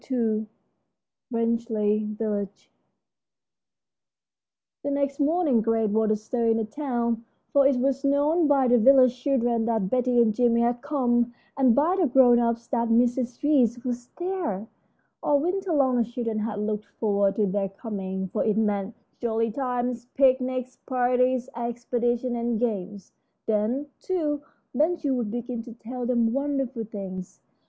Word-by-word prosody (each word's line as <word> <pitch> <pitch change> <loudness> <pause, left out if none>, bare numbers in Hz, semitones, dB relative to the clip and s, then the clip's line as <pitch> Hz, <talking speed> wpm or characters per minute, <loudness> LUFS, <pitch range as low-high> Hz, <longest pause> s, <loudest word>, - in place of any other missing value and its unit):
II 220 -4 0 0.8
RANGELEY 220 -3 0
VILLAGE 205 -3 -4 2.1
The 285 - -3
next 280 0 -1
morning 295 -5 +2
great 225 -1 +1
was 220 +1 +2
the 215 - +3
stir 230 +2 -2
in 225 0 +3
the 225 - -1
town, 235 -2 -2 0.3
for 280 -1 +6
it 275 - +2
was 270 +2 0
known 295 +4 +2
by 275 -3 +3
the 245 0 +4
village 255 +1 +6
children 240 -4 +1
that 220 -5 -1
Betty 250 -1 +2
and 225 -2 +4
Jimmie 235 +1 +2
had 240 0 0
come, 240 -4 0 0.2
and 260 -4 +4
by 335 +6 +2
the 340 - +3
grown 245 -2 +5
ups 235 0 0
that 235 -3 0
Mrs. 245 +2 +1
Reece 250 -5 +2
was 245 -1 -3
there. 350 - -3 0.6
All 290 -1 +2
winter 370 +4 -1
long 265 -5 +3
the 235 - +3
children 230 -1 -3
had 215 -1 -3
looked 210 0 -2
forward 200 -2 +1
to 215 - +2
their 195 0 -1
coming, 190 -2 -5
for 215 - -1
it 215 -1 +1
meant 210 0 0 0.2
jolly 230 -1 0
times: 245 -1 -2
picnics, 255 -1 +1
parties, 250 0 +1
expeditions, 240 +1 -1
and 235 -1 -1
games. 205 -4 -3 0.3
Then, 220 +6 0
too, 305 -6 -1 0.3
Ben 310 +7 +2
Gile 285 -5 -2
would 240 -4 -1
begin 240 +1 -4
to 235 0 -10
tell 240 +2 -6
them 235 -2 +2
wonderful 270 -4 -2
things. 190 -3 -7
240 Hz, 150 wpm, -25 LUFS, 220-265 Hz, 2.1 s, for